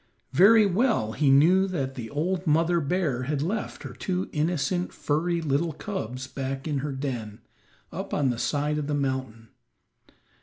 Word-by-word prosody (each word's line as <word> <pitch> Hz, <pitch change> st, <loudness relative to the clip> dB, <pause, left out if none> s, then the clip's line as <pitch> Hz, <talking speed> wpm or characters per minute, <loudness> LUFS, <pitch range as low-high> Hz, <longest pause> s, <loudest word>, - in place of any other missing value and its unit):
Very 210 Hz, +8 st, +7 dB
well 195 Hz, -, +1 dB
he 140 Hz, +4 st, +1 dB
knew 175 Hz, +8 st, +5 dB
that 140 Hz, -8 st, -3 dB
the 120 Hz, -4 st, -7 dB
old 175 Hz, +5 st, -2 dB
mother 165 Hz, +3 st, +3 dB
bear 150 Hz, -4 st, 0 dB
had 145 Hz, 0 st, -1 dB
left 210 Hz, +5 st, -3 dB
her -, -, -7 dB
two 185 Hz, -1 st, -3 dB
innocent, 165 Hz, +2 st, 0 dB
furry 170 Hz, +3 st, -1 dB
little 155 Hz, +3 st, 0 dB
cubs 130 Hz, -, -5 dB
back 135 Hz, +2 st, -5 dB
in 145 Hz, -3 st, -1 dB
her 145 Hz, +2 st, -3 dB
den, 125 Hz, -6 st, -4 dB, 0.5 s
up -, -, -6 dB
on 135 Hz, -3 st, +1 dB
the 120 Hz, -, -4 dB
side 150 Hz, +2 st, 0 dB
of 145 Hz, -, -3 dB
the 150 Hz, -, 0 dB
mountain. 130 Hz, -5 st, -3 dB
150 Hz, 160 wpm, -26 LUFS, 135-175 Hz, 0.5 s, Very